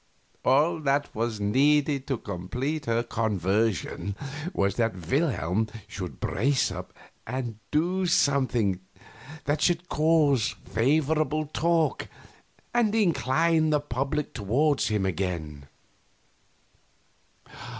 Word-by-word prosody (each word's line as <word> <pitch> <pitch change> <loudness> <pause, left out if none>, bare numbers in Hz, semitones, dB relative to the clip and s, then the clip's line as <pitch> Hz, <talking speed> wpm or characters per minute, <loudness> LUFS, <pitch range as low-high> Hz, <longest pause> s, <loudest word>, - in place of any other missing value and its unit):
All 150 +6 +3
that 145 -1 0
was 115 -1 -2
needed 140 +6 +2
to 135 - 0
complete 125 - -4
her 115 0 +1
conversion 100 -3 -1 0.4
was 100 - +1
that 115 -4 +1
Wilhelm 110 - +1 0.2
should 90 -4 -7
brace 135 +6 +1
up - - -7 0.4
and 120 -2 -4
do 180 +5 +1
something 125 - +2 0.7
that 145 +1 0
should 175 0 +1
cause 150 -6 +3
favorable 155 +5 +1
talk 165 +2 0 0.7
and 225 -3 +2
incline 165 -4 +2
the 150 -1 +3
public 140 +1 -2
toward 135 +8 +1
him 105 -3 +1
again. 80 -6 -3
135 Hz, 100 wpm, -27 LUFS, 105-155 Hz, 0.7 s, All